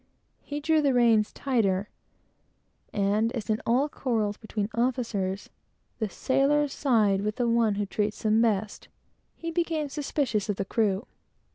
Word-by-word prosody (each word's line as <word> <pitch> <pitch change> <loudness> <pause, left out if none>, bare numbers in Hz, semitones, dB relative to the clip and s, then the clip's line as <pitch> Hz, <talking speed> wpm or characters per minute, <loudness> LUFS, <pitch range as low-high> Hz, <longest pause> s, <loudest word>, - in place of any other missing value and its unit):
He 290 0 -5
drew 315 +1 +2
the 275 -3 +2
reins 225 -3 +4
tauter; 205 -8 0 1.1
and 210 +3 +1
as, 225 -2 -3
in 215 - 0
all 255 +5 +3
quarrels 225 -8 -1
between 215 -1 -3
officers, 230 -6 -1 0.5
the 220 -3 -1
sailors 280 +5 +1
side 215 -8 +2
with 210 +1 -2
the 245 - 0
one 230 -3 +2
who 205 0 -1
treats 210 +2 -2
them 220 +1 +3
best, 215 -2 0 0.5
he 330 0 -5
became 325 -3 -1
suspicious 275 -8 -1
of 205 - +1
the 195 - -3
crew. 210 +1 0
225 Hz, 145 wpm, -27 LUFS, 210-270 Hz, 1.1 s, reins